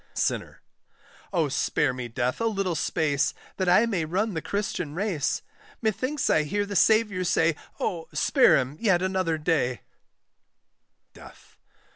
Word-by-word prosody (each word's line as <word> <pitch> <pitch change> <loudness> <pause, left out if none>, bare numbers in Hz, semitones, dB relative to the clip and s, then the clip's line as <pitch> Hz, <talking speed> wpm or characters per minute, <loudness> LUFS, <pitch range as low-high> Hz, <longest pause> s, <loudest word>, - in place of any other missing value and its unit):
SINNER. - - -2 0.7
Oh 170 -5 +1
spare 135 -1 0
me, 125 -1 -5
Death, 125 - -2
a 230 - +2
little 195 -5 -1
space, 145 -3 0 0.2
That 185 -2 +1
I 200 +6 +5
may 200 -8 -1
run 190 +7 -1
the 160 - -3
Christian 180 -6 -3
race! 180 -7 -1 0.4
Methinks 255 +6 -1
I 155 - +4
hear 205 +7 -1
the 205 0 -6
Saviour 210 -2 +3
say, 165 -2 +2 0.2
Oh 165 -3 -2
spare 270 - +4
him 135 +2 -2
yet 190 -6 +2
another 185 -4 0
day; 150 - 0 1.3
DEATH. - - -16
175 Hz, 140 wpm, -26 LUFS, 150-205 Hz, 1.3 s, I